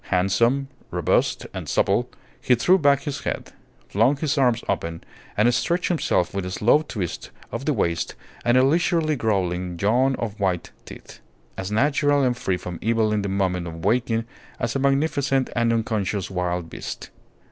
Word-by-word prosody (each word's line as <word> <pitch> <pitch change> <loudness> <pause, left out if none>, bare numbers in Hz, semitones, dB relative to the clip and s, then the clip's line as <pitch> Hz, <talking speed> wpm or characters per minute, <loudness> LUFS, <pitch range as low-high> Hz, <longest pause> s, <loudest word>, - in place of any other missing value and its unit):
Handsome, 115 +9 +2 0.2
robust, - - +1
and - - -6
supple, - - +1 0.3
he 125 - +4
threw 180 +11 +4
back 140 -2 +3
his 145 -3 -3
head, - - -4 0.3
flung 120 +8 +2
his 150 0 0
arms 125 -4 +2
open, 85 0 -2 0.3
and 120 +4 +4
stretched 170 +8 0
himself 155 - +1
with 100 -1 -2
a 90 - -4
slow 115 +10 +3
twist 105 - -5 0.2
of 115 +4 -4
the 150 - +2
waist 85 -8 -1 0.3
and 120 +1 +3
a 130 - +6
leisurely 160 +1 +2
growling 90 -6 -1
yawn 125 +7 +3
of 110 -3 -5
white 95 -3 -1
teeth, - - -12 0.4
as 95 +1 -5
natural 145 +4 +2
and 125 -1 +2
free 95 -6 -1
from 90 -1 -7
evil 110 -1 +1
in 105 - +1
the 100 - -3
moment 95 -2 0
of 80 0 -7
waking 115 +1 +1 0.3
as 120 0 -2
a - - +1
magnificent 140 -1 +1
and 115 -1 +2
unconscious 105 -4 -1
wild 90 -2 -2
beast. - - -7
115 Hz, 170 wpm, -23 LUFS, 95-135 Hz, 0.4 s, a